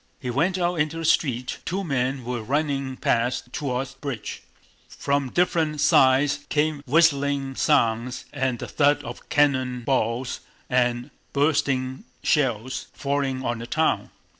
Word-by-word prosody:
He 125 Hz, -, -4 dB
went 175 Hz, +9 st, +1 dB
out 175 Hz, -2 st, 0 dB
into 155 Hz, +2 st, 0 dB
the 165 Hz, -, -3 dB
street: 130 Hz, -6 st, +1 dB
two 190 Hz, +2 st, -2 dB
men 130 Hz, -4 st, -1 dB
were 120 Hz, -1 st, -3 dB
running 135 Hz, +1 st, -1 dB
past 120 Hz, +1 st, 0 dB
toward 130 Hz, -2 st, -2 dB
the 135 Hz, 0 st, -18 dB
bridge. 135 Hz, -7 st, -5 dB, 0.5 s
From 140 Hz, -1 st, -1 dB
different 160 Hz, -2 st, +1 dB
sides 135 Hz, 0 st, +4 dB
came 150 Hz, -1 st, +1 dB
whistling 140 Hz, -2 st, +2 dB
sounds 120 Hz, 0 st, +1 dB
and 130 Hz, -2 st, -1 dB
the -, -, -6 dB
thud 145 Hz, 0 st, +2 dB
of -, -, -9 dB
cannon 130 Hz, -4 st, +2 dB
balls 125 Hz, 0 st, 0 dB, 0.3 s
and 125 Hz, +1 st, +1 dB, 0.2 s
bursting 140 Hz, -3 st, 0 dB, 0.2 s
shells 130 Hz, -3 st, 0 dB
falling 140 Hz, -2 st, -1 dB
on 120 Hz, -1 st, -1 dB
the 115 Hz, -, -7 dB
town. 155 Hz, +6 st, +1 dB
135 Hz, 140 wpm, -24 LUFS, 125-145 Hz, 0.5 s, sides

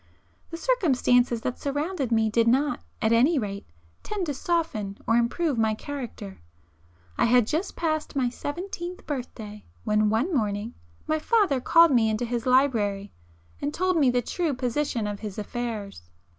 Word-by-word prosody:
The 330 Hz, -, -6 dB
circumstances 250 Hz, -, +2 dB
that 250 Hz, -, -3 dB
surrounded 290 Hz, -1 st, -2 dB
me, 225 Hz, -1 st, +3 dB
did 230 Hz, +1 st, +2 dB
not, 280 Hz, +5 st, +2 dB, 0.2 s
at 220 Hz, -, +3 dB
any 270 Hz, +8 st, +4 dB
rate, 200 Hz, -5 st, -4 dB, 0.3 s
tend 410 Hz, -4 st, -3 dB
to 295 Hz, -, -2 dB
soften 265 Hz, -, -2 dB
or 225 Hz, -, +2 dB
improve 245 Hz, +4 st, +1 dB
my 220 Hz, -1 st, +2 dB
character. 235 Hz, -, -7 dB, 0.8 s
I -, -, +4 dB
had 245 Hz, -1 st, +4 dB
just 315 Hz, -, -2 dB
passed 310 Hz, -3 st, -2 dB
my 260 Hz, -3 st, +2 dB
seventeenth 345 Hz, +7 st, -5 dB
birthday, 220 Hz, -7 st, -6 dB, 0.2 s
when 210 Hz, -1 st, +2 dB
one 235 Hz, -, 0 dB
morning 210 Hz, -2 st, -1 dB, 0.3 s
my 310 Hz, 0 st, 0 dB
father 375 Hz, -, +2 dB
called 335 Hz, +4 st, +6 dB
me 230 Hz, -4 st, +4 dB
into 220 Hz, +2 st, -1 dB
his 240 Hz, +1 st, -3 dB
library 215 Hz, -7 st, +2 dB, 0.5 s
and 285 Hz, -, -1 dB
told 370 Hz, +3 st, 0 dB
me 290 Hz, -6 st, +4 dB
the 245 Hz, 0 st, +1 dB
true 330 Hz, -1 st, -1 dB
position 250 Hz, -2 st, -1 dB
of 205 Hz, -1 st, -4 dB
his 210 Hz, -3 st, -7 dB
affairs. 210 Hz, -, -5 dB
250 Hz, 155 wpm, -26 LUFS, 220-305 Hz, 0.8 s, called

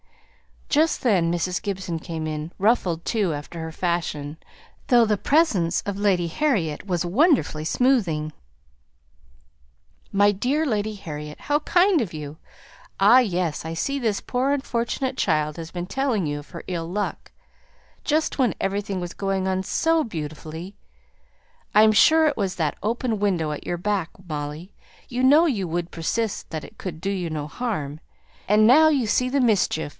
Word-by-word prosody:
Just 310 Hz, +2 st, +2 dB
then 185 Hz, -9 st, +3 dB
Mrs. 175 Hz, +1 st, -1 dB
Gibson 185 Hz, -4 st, -3 dB
came 160 Hz, -1 st, -5 dB
in, 155 Hz, +1 st, -4 dB
ruffled 185 Hz, -6 st, +1 dB
too 205 Hz, -8 st, 0 dB
after 150 Hz, +3 st, -7 dB
her 160 Hz, 0 st, -5 dB
fashion, 160 Hz, -4 st, -2 dB, 0.5 s
though 240 Hz, -3 st, +5 dB
the 210 Hz, -1 st, +1 dB
presence 200 Hz, -, +2 dB
of 200 Hz, -1 st, -4 dB
Lady 190 Hz, -4 st, +2 dB
Harriet 195 Hz, -, -1 dB
was 180 Hz, -2 st, -1 dB
wonderfully 225 Hz, -, +2 dB
smoothing. 175 Hz, -, +1 dB, 1.8 s
"My 205 Hz, +1 st, +5 dB
dear 260 Hz, +10 st, 0 dB
Lady 215 Hz, -4 st, -1 dB
Harriet 150 Hz, -6 st, -8 dB
how 295 Hz, +1 st, +1 dB
kind 355 Hz, +3 st, +3 dB
of 195 Hz, -8 st, -4 dB
you! 150 Hz, -1 st, -7 dB, 0.6 s
Ah, 215 Hz, +6 st, +8 dB
yes, 180 Hz, -10 st, -1 dB
I 160 Hz, -, -4 dB
see 275 Hz, +12 st, -2 dB
this 220 Hz, -5 st, -1 dB
poor 255 Hz, +3 st, 0 dB
unfortunate 260 Hz, 0 st, -2 dB
child 155 Hz, -3 st, 0 dB
has 165 Hz, -1 st, -6 dB
been 175 Hz, 0 st, -5 dB
telling 255 Hz, -6 st, 0 dB
you 145 Hz, 0 st, -2 dB
of 145 Hz, -, -14 dB
her 170 Hz, -, -8 dB
ill 170 Hz, -3 st, -3 dB
luck; 205 Hz, +4 st, -4 dB, 0.7 s
just 310 Hz, -1 st, 0 dB
when 250 Hz, -5 st, +2 dB
everything 195 Hz, -1 st, -2 dB
was 175 Hz, 0 st, -5 dB
going 195 Hz, -1 st, -1 dB
on 190 Hz, 0 st, -1 dB
so 325 Hz, -, +1 dB
beautifully; 160 Hz, 0 st, -7 dB, 1.0 s
I'm 215 Hz, +1 st, +7 dB
sure 315 Hz, +9 st, +5 dB
it 295 Hz, -, 0 dB
was 195 Hz, -3 st, -1 dB
that 155 Hz, -4 st, -1 dB
open 225 Hz, 0 st, -1 dB
window 180 Hz, -7 st, 0 dB
at 150 Hz, -, -6 dB
your 175 Hz, -, -1 dB
back, 190 Hz, -2 st, -1 dB, 0.2 s
Molly, 150 Hz, +4 st, -5 dB, 0.4 s
you 250 Hz, 0 st, -2 dB
know 290 Hz, +6 st, +6 dB
you 210 Hz, -, 0 dB
would 170 Hz, +1 st, -3 dB
persist 210 Hz, +6 st, -2 dB
that 155 Hz, -1 st, -5 dB
it -, -, -13 dB
could 165 Hz, -4 st, -6 dB
do 195 Hz, -, -1 dB
you 180 Hz, -4 st, -2 dB
no 155 Hz, -2 st, -3 dB
harm, 155 Hz, -, -4 dB, 0.5 s
and 210 Hz, +2 st, +5 dB
now 300 Hz, +7 st, +7 dB
you 280 Hz, -6 st, +2 dB
see 250 Hz, +4 st, +1 dB
the 275 Hz, +1 st, +1 dB
mischief! 200 Hz, -10 st, +1 dB
195 Hz, 160 wpm, -24 LUFS, 165-240 Hz, 1.8 s, Ah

